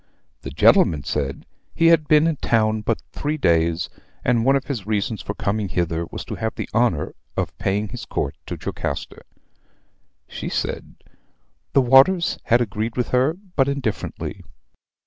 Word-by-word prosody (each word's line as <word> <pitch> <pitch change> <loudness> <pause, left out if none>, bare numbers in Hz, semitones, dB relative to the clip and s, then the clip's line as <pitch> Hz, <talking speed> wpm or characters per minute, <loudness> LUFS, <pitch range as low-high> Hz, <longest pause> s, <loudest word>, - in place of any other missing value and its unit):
"The - - -6
gentleman 75 -4 +4
said, 70 -2 -3 0.3
'he 165 - +5
had 155 -2 +2
been 155 0 +5
in 165 -3 +1
town 110 -3 +1
but 110 +1 -1
three 150 +2 -2
days; 85 - +2 0.4
and 120 -2 +3
one 135 +3 +4
of 135 - 0
his 120 -9 -4
reasons 110 0 -1
for 100 - -5
coming 100 -1 -1
hither 85 -2 -1
was - - -7
to - - -6
have 110 0 -2
the - - -4
honor 105 -10 +1 0.2
of - - -2
paying 100 +2 -1
his 125 - -7
court - - -2
to - - -4
Jocasta.' - - -4 1.1
"She - - -5
said, - - -3 0.8
'the 135 - +5
waters 135 +8 +5
had 120 +1 +4
agreed 110 +1 -2
with 125 - 0
her 130 +6 +2 0.2
but 135 -2 +3
indifferently.' 140 -6 -3
115 Hz, 160 wpm, -22 LUFS, 100-135 Hz, 1.1 s, he